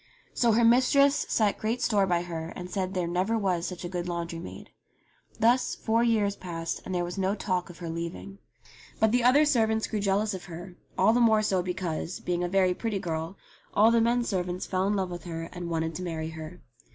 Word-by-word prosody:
So 235 -2 +3
her 235 +2 +3
mistress 275 +4 +4
set 210 -3 +1
great 225 +3 -1
store 205 -5 +2
by 175 -1 +1
her 165 -2 -5
and 180 0 -7
said 190 0 -2
there 180 -1 0
never 185 +6 0
was 185 -4 0
such 180 -1 -6
a - - -2
good 175 -1 -4
laundry 170 -1 -4
maid. 170 - -10 0.7
Thus 240 +3 +3
four 230 +1 +1
years 215 -4 +2
passed 165 -2 -5
and 185 - -3
there 175 - +1
was 175 +3 -5
no 190 +2 +1
talk 185 -4 -2
of 175 - -11
her 175 - -7
leaving. 170 +4 -6 0.6
But 220 -1 +4
the 245 0 +2
other 275 +5 +6
servants 220 -6 +2
grew 215 - -3
jealous 200 +1 +1
of 185 - -7
her, 175 +2 -9 0.2
all 195 +4 +5
the 245 - +3
more 220 -2 +5
§0 190 -4 +1
because, 180 -2 -3
being 175 0 -2
a 175 - -1
very 185 -1 +3
pretty 220 +2 -2
girl, 165 0 -4 0.4
all 220 +3 +6
the 230 0 +4
men 240 +1 +2
servants 180 -4 -2
fell 185 0 0
in 205 - +1
love 190 -2 -1
with 175 -1 -7
her 165 -1 -5
and 175 -1 -5
wanted 165 0 -1
to 180 - -6
marry 160 -3 -3
her. 160 +2 -9
185 Hz, 220 wpm, -28 LUFS, 175-220 Hz, 0.7 s, other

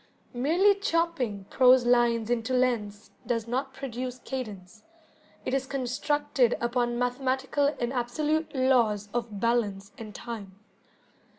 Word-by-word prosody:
Merely 335 +11 +4
chopping 330 - -1
prose 255 -1 +6
lines 240 -2 +3
into 240 +2 0
lengths 220 -5 -1 0.2
does 230 -2 -1
not 265 +3 -2
produce 255 -2 -5
cadence, 215 -7 -7 0.6
it - - -2
is 270 0 0
constructed 270 -1 0
upon 240 0 0
mathematical 265 +3 0
and 240 +1 -1
absolute 300 +6 -1
laws 235 -6 +2
of 230 -4 -3
balance 210 -3 0
and 215 -2 -9
time. 210 -5 -7
245 Hz, 115 wpm, -28 LUFS, 230-265 Hz, 0.6 s, prose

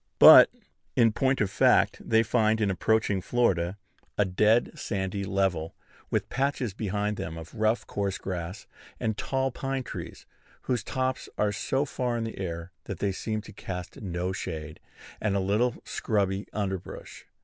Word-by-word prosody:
But, - - +10 0.5
in 115 -2 +5
point 130 +3 +1
of 100 -2 +1
fact, - - +3
they 115 0 +3
find, 110 -1 +2
in 105 -2 +2
approaching 105 +1 +1
Florida, 95 -6 +1 0.4
a 105 - +4
dead 105 +5 +3
sandy 100 -1 -3
level, 95 -4 0 0.3
with - - 0
patches 135 -5 -1
behind 105 0 -2
them 80 0 -5
of 80 0 -9
rough 110 +1 +1
coarse 100 -1 -2
grass, 90 +1 -5 0.3
and 110 -1 -1
tall 135 +4 -1
pine 135 +1 -3
trees, - - -8 0.4
whose 125 -3 -1
tops 130 0 -2
are 105 -1 +2
so 135 +7 0
far 125 -3 -2
in 115 - -2
the 115 -3 -6
air 85 -2 -4
that 100 - -5
they 100 +2 0
seem 110 +3 -3
to - - -12
cast 90 -1 -7
no 90 -2 -2
shade, 80 -5 -5 0.4
and 105 -2 +1
a - - +2
little 105 +6 +1
scrubby 100 -2 -1
underbrush. 95 -3 -5
105 Hz, 160 wpm, -28 LUFS, 95-115 Hz, 0.5 s, But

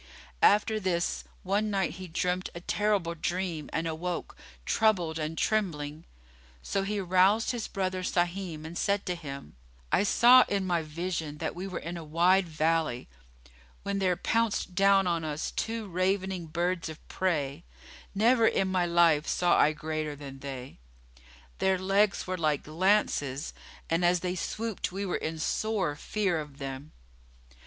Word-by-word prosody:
After 215 +1 +4
this, 180 -3 -1 0.2
one 205 +3 0
night 195 -3 0
he 185 +1 -8
dreamt 180 +2 -1
a 170 - -6
terrible 205 -3 0
dream 170 -2 -3
and 165 - -1
awoke, 170 +2 -4 0.3
troubled 180 -7 +2
and 155 +1 -3
trembling. 160 -8 -1 0.6
So 195 - -1
he 205 +2 -2
aroused 190 +3 +3
his 240 -3 -3
brother 185 -1 -2
Sahim 175 -3 -2
and 165 +2 -7
said 200 +2 0
to 180 - -1
him, 140 - -8 0.4
"I - - +4
saw 245 +5 +7
in 200 -1 -1
my 175 -2 +1
vision 160 -1 -4
that 160 +1 -3
we 185 +2 -5
were 185 - -5
in 170 +1 -5
a 170 - -7
wide 175 +4 +3
valley, 160 - 0 0.7
when 200 0 -1
there 185 -2 +2
pounced 225 0 0
down 195 0 +4
on 170 -2 0
us 155 0 -3
two 225 -1 -3
ravening 185 -1 -1
birds 170 +1 -1
of 160 - -11
prey, 155 -4 -1 0.5
never 230 +2 +4
in 195 -1 +1
my 180 -2 +1
life 170 -3 +4
saw 175 -1 +3
I 150 - +5
greater 155 -1 -4
than 135 -2 -9
they; 135 - -8 0.8
their 190 0 +2
legs 195 +2 +2
were 185 -1 -3
like 155 -3 0
lances, 155 -5 +1 0.3
and 165 +2 +1
as 175 0 +3
they 180 -1 -1
swooped 215 +4 -3
we 195 +2 -3
were 180 - -1
in 160 +1 -4
sore 190 -1 -1
fear 190 0 -1
of 150 -2 -8
them." 135 +1 -6
180 Hz, 155 wpm, -29 LUFS, 160-195 Hz, 0.8 s, saw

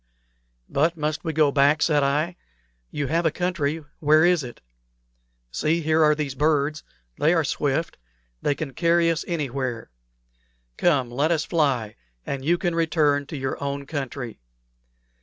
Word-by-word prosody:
"But 165 +4 +1
must 155 0 -2
we 165 - -1
go 155 -2 +3
back?" 145 +2 +3
said 150 -3 +3
I. 150 +5 0 0.5
"You 145 - -3
have 165 +5 0
a 160 - +3
country. 160 -3 -2
Where 155 +2 +5
is 175 -4 +3
it? 120 -1 -9 0.9
See, 155 - 0
here 160 0 +3
are 150 0 +5
these 150 -3 -3
birds. 150 +1 +1 0.4
They 160 +4 +3
are 165 - +2
swift. 145 - -1 0.4
They 145 - +1
can 140 -3 -5
carry 170 +3 +3
us 165 - -2
anywhere. 135 - -3 0.8
Come, 135 -8 +1
let 140 +6 +1
us 160 -2 +1
fly, 135 -10 0 0.3
and 135 -1 -4
you 170 +5 +2
can 175 -1 -1
return 150 -4 +1
to 155 - -6
your 130 +1 -3
own 140 0 -3
country." 135 -5 -5
150 Hz, 155 wpm, -24 LUFS, 140-165 Hz, 0.9 s, Where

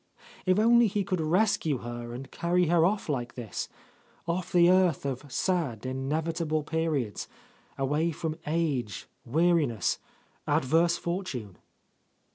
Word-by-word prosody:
If 185 +1 +4
only 235 +2 +6
he 205 0 0
could 185 -3 -1
rescue 165 -3 +2
her 120 0 -6
and 130 +3 -8
carry 175 +1 +1
her 170 -1 +4
off 205 +1 -2
like 125 -5 -2
this, 115 -5 -5 0.3
— - - -33
off 170 +1 -2
the 175 -1 +6
earth 180 -5 +3
of 135 +1 -4
sad, 155 - -1
inevitable 155 +4 -1
periods, 150 -8 -1 0.5
away 150 +5 +1
from 160 +1 -4
age, 135 - -1 0.2
weariness, 150 - +2 0.5
adverse 165 +6 +3
fortune! 145 - -4
160 Hz, 125 wpm, -28 LUFS, 130-175 Hz, 0.5 s, only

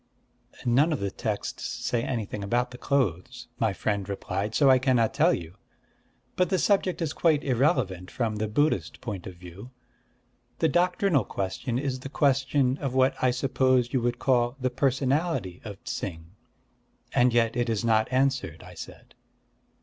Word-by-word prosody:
"None 135 +7 +3
of 150 - -1
the 100 -1 -2
texts 105 +1 -4
say 120 - -2
anything 110 -4 -3
about 120 +5 0
the 125 - -10
clothes," 120 - -1
my - - +2
friend 100 -2 -2
replied: 100 +2 -3
"so 145 - +4
I 130 -1 +6
cannot 125 -4 +2
tell 155 +6 +4
you. 85 - -4 0.8
But 180 - +2
the 190 - +2
subject 185 -2 +1
is 155 -2 -2
quite 155 -3 +2
irrelevant, 120 - +1
from 110 -3 -2
the 110 +1 -1
Buddhist 100 - 0
point 100 -6 -6
of 95 - -8
view. 90 +6 -11 0.9
The 160 - +2
doctrinal 180 - +2
question 100 +6 -3
is 130 -1 -2
the 135 - -7
question 135 -1 +2
of 135 -3 -3
what 130 +1 +4
I 130 - +5
suppose 130 -1 +1
you 130 - +2
would 120 0 0
call 120 -1 +1
the 130 -1 -1
personality 135 - 0
of 100 -3 -9
Ts'ing." 85 -3 -5 0.8
"And 125 0 +4
yet 115 -1 +2
it 120 -1 0
is 115 0 -1
not 110 0 +2
answered," 130 - 0
I 90 0 -12
said. 85 - -11
125 Hz, 165 wpm, -27 LUFS, 100-135 Hz, 0.9 s, I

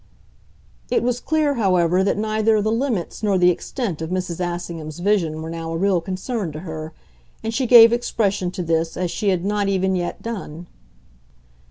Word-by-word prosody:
It - - +1
was 245 0 0
clear, 310 +1 +1
however, 185 -5 +2
that 200 - +1
neither 215 0 +1
the 215 +1 0
limits 230 -7 -2
nor 205 -3 +2
the 180 0 +5
extent 185 - -4
of 160 - -4
Mrs. 180 -2 -3
Assingham's 170 -3 -5
vision 175 -5 0
were 160 - -6
now 165 0 -5
a 165 - -2
real 190 -1 +2
concern 190 +1 -4
to 155 - -7
her, 160 -2 -6 0.5
and 225 0 -3
she 255 +2 0
gave 230 -1 +9
expression 205 -6 0
to 180 0 -5
this 165 0 -1
as 180 -2 -1
she 205 - -1
had 185 -1 0
not 205 -1 0
even 190 -1 +1
yet 175 -1 -3
done. 180 -8 -6
190 Hz, 180 wpm, -21 LUFS, 170-220 Hz, 0.5 s, gave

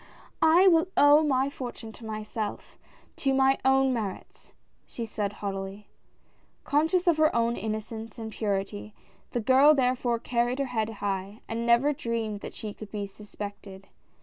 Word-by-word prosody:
"I 330 +4 +6
will 330 -1 +5
owe 290 +1 +7
my 275 -2 +1
fortune 240 -4 -7
to 225 - -12
myself 215 0 -5 0.2
— - - -31
to 270 -1 +1
my 270 0 +3
own 265 0 +4
merits," 210 -6 -6 0.4
she 235 - -5
said, 210 -2 -3
haughtily. 195 0 -6 0.7
Conscious 320 +5 +1
of 340 -3 +3
her 310 0 +3
own 235 0 +2
innocence 220 0 -5
and 220 -1 -6
purit}", 205 0 -3 0.4
the 240 - -2
girl 270 +6 +6
therefore 250 -2 +1
carried 240 +1 -1
her 275 - 0
head 220 -1 0
high, 200 -1 -4
and 230 +1 -3
never 240 +5 +4
dreamed 230 -5 -3
that - - -9
she 210 -2 -6
could 215 0 -10
be 205 -2 -3
suspected. 200 -1 -9
230 Hz, 155 wpm, -27 LUFS, 210-270 Hz, 0.7 s, owe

